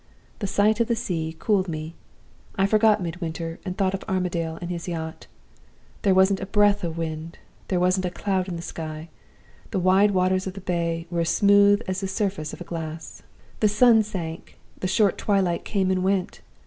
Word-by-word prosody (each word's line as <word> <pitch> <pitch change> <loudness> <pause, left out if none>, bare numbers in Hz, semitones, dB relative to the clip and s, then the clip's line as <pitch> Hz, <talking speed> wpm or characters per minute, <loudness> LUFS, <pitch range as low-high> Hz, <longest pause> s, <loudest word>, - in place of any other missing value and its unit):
The 200 - -2
sight 210 +3 +2
of 235 - +2
the 235 - +1
sea 165 -8 -3
cooled 195 -1 +1
me. 155 0 -5 0.6
I 195 -2 +2
forgot 215 -1 +3
Midwinter, 165 -1 -5
and 185 -2 -5
thought 190 -1 +1
of 195 - -4
Armadale 170 -3 -1
and 175 0 -5
his 170 0 -5
yacht. 160 -2 -5 0.7
There 195 -3 +3
wasn't 190 +1 +4
a 195 - -5
breath 205 0 +3
of 165 -1 -3
wind; 160 0 -5 0.3
there 185 - 0
wasn't 185 +1 +2
a - - -1
cloud 185 +1 -1
in 180 - -4
the 170 - -6
sky; 160 -1 -6 0.6
the 200 - -2
wide 190 +3 +4
waters 185 0 +1
of 190 - -4
the 195 - -7
Bay 170 -2 -2
were 170 -1 0
as 165 - 0
smooth 205 +1 +5
as 185 +1 -2
the 195 - -2
surface 190 -6 -2
of - - -9
a - - -6
glass. 160 -2 -7 0.4
"The 215 - +4
sun 225 +1 +5
sank; 170 -6 -6 0.2
the 185 - -1
short 200 +1 +2
twilight 190 -4 +1
came 190 -3 0
and 185 -1 0
went. 190 -1 -1
185 Hz, 195 wpm, -24 LUFS, 170-200 Hz, 0.7 s, smooth